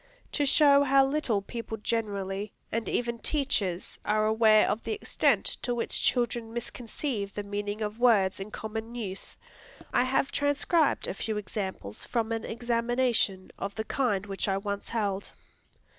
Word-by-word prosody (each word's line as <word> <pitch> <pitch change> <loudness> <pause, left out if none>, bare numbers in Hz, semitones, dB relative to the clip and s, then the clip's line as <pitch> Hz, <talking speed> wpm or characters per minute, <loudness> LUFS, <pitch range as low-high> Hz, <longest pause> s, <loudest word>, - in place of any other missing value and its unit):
To 290 -2 +1
show 280 0 +6
how 275 -1 +5
little 270 -8 0
people 230 +1 -5
generally, 205 -2 -2 0.2
and 230 0 -1
even 235 -1 -1
teachers, 215 - -1
are 215 0 +2
aware 220 -1 +5
of 215 - 0
the - - -2
extent 425 - +1 0.2
to 245 - -1
which 235 - -1
children 240 -2 +1
misconceive 235 -2 -4
the 205 - -3
meaning 205 +1 -3
of 210 +2 -4
words 205 -7 +4
in 195 +2 -5
common 220 +2 -5
use, 200 -5 -5 0.6
I 245 - +4
have 270 +1 +1
transcribed 290 +2 +2
a - - -2
few 215 +2 -3
examples 190 - -4
from 230 -2 -1
an 225 0 -1
examination 235 -4 0
of 200 0 -4
the 220 - -2
kind 210 -8 0
which 195 0 -3
I 195 -1 +1
once 200 0 -4
held. 200 -4 -2
220 Hz, 155 wpm, -29 LUFS, 200-245 Hz, 0.6 s, show